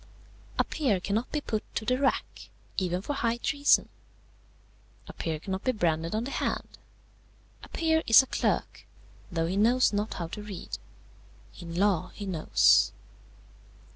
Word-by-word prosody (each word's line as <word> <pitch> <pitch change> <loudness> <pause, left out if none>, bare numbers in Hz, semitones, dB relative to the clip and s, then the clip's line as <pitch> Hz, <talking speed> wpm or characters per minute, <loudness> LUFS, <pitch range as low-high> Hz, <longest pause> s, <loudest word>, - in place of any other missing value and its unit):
"A - - +4
peer 255 - 0
cannot 210 +6 -2
be 300 - -1
put 215 -6 -2
to 220 - -2
the 255 +3 +1
rack, 275 - -1 0.3
even 180 -1 -1
for 290 - -2
high 235 -4 0
treason. 285 +3 +3 1.2
A - - -9
peer 160 -2 -3
cannot 190 +4 -4
be 255 - +1
branded 165 -4 0
on 220 - 0
the 270 - -5
hand. - - -3 0.8
A - - -13
peer 320 -1 +1
is 225 +3 +8
a - - -7
clerk, - - -2 0.4
though 165 -1 0
he 185 +4 -2
knows 235 +3 +4
not 205 +2 -1
how 170 - -3
to 210 - -6
read. 205 -3 -7 0.8
In 170 -2 -7
law 195 -2 +2
he 205 - -6
knows. 175 -5 +4
210 Hz, 155 wpm, -28 LUFS, 180-250 Hz, 1.2 s, is